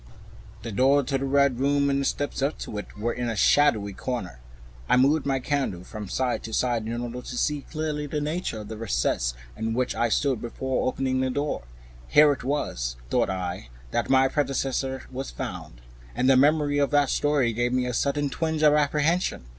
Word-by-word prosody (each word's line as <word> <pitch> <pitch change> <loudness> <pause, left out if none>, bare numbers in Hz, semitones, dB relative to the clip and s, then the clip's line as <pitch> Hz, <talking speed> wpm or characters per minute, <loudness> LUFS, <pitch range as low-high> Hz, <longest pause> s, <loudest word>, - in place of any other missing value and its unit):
The 115 - -5
door 135 +6 +4
of - - -8
the 135 0 -1
Red 140 -2 +2
Room 140 +1 +2
and 140 0 +1
the - - -1
steps 145 0 -2
up 140 +3 0
to 105 - -5
it 105 - -10
were 115 +3 -1
in 120 -1 -2
a 115 - -2
shadowy 110 -4 +3
corner. 95 - -5 0.5
I - - +5
moved 140 +3 +3
my 135 -1 +1
candle 130 - -2
from 105 0 -8
side 130 +4 -1
to 110 - -8
side 120 -3 0
in 120 +1 -3
order 120 +1 -5
to 125 - -7
see 150 +1 0
clearly 150 -2 -3
the 150 +1 -2
nature 150 -6 -3
of 105 - -9
the 110 - -6
recess - - 0 0.2
in 115 0 -2
which 125 0 0
I 120 - 0
stood, 135 +1 +1
before 130 +2 -2
opening 130 0 0
the 130 0 +1
door. 145 +3 -2 0.5
Here 150 - +6
it 140 - -3
was, - - -2 0.2
thought - - +2
I, 90 -8 -4 0.2
that - - -1
my 135 0 +5
predecessor 135 -1 -1
was 135 +1 -5
found, - - -7 0.3
and 130 - +1
the 135 - +6
memory 145 +1 +3
of 140 - +2
that 145 -2 +3
story 145 -5 +2
gave 120 +2 0
me 125 0 +1
a 125 - -2
sudden 140 +2 0
twinge 160 0 -1
of 150 -1 +6
apprehension. 150 - +1
130 Hz, 200 wpm, -26 LUFS, 115-145 Hz, 0.5 s, Here